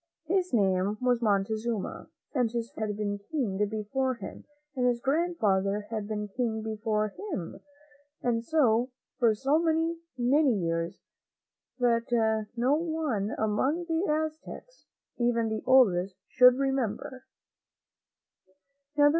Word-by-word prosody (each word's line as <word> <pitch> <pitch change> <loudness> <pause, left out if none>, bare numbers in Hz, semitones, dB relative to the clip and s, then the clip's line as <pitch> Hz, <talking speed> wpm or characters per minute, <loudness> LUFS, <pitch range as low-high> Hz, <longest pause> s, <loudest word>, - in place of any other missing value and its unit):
His 365 +2 0
name 195 -2 +2
was 250 -1 +1
Montezuma, 215 +1 -1 0.2
and 250 -5 +2
his 235 -1 -3
father 220 - -3
had 205 -1 -4
been 205 -1 -2
King 220 -2 -2
before 250 +5 -1
him 200 -5 -9 0.3
and 250 -1 +2
his 240 -1 +1
grandfather 220 - +1
had 215 -2 -3
been 210 -1 -3
King 220 0 -2
before 215 -1 -1 0.2
Aim; 170 -2 -6 0.6
and 230 -1 +1
so, 245 -4 +2 0.3
for 230 -3 +4
so 275 +7 +2
many, 330 0 +1 0.2
many 260 +1 +3
years, 165 -2 -2 0.7
that 230 -3 +1
no 245 +4 +2
one 310 -10 -1
among 260 +11 0
the 330 +3 0
Aztecs, 315 +10 -5 0.3
even 235 -2 +1
the 220 0 -2
oldest, 195 -8 +4 0.2
could 250 0 +9
remem 265 -5 0
ber. 265 -2 -10
235 Hz, 120 wpm, -28 LUFS, 210-270 Hz, 0.7 s, could